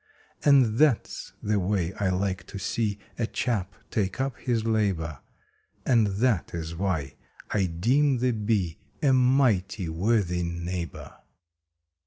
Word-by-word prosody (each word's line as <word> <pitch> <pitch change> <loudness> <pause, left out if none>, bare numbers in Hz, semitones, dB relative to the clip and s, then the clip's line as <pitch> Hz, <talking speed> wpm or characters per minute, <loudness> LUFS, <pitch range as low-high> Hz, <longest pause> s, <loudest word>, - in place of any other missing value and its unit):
And 130 -6 +5
that 150 -7 +4
s - - -9
the 105 0 +1
way 95 -2 0
I 100 -2 -1
like 95 +1 -1
to - - -7
see 105 +1 -1 0.2
a 115 - +1
chap 100 -8 -2 0.2
take 100 +1 -1
up 135 -1 -1
his 115 -3 -1
labor, 95 - 0 0.7
And 115 -5 +4
that 100 -3 0
is 80 0 -4
why 80 -7 -2 0.3
I 100 -3 +2
deem 125 - +2
the 125 +1 +1
Bee 105 -7 -1 0.2
a 135 -2 +5
mighty 125 -8 +2
worthy 90 +1 +1
neighbor! 85 0 -5
100 Hz, 135 wpm, -27 LUFS, 90-120 Hz, 0.7 s, And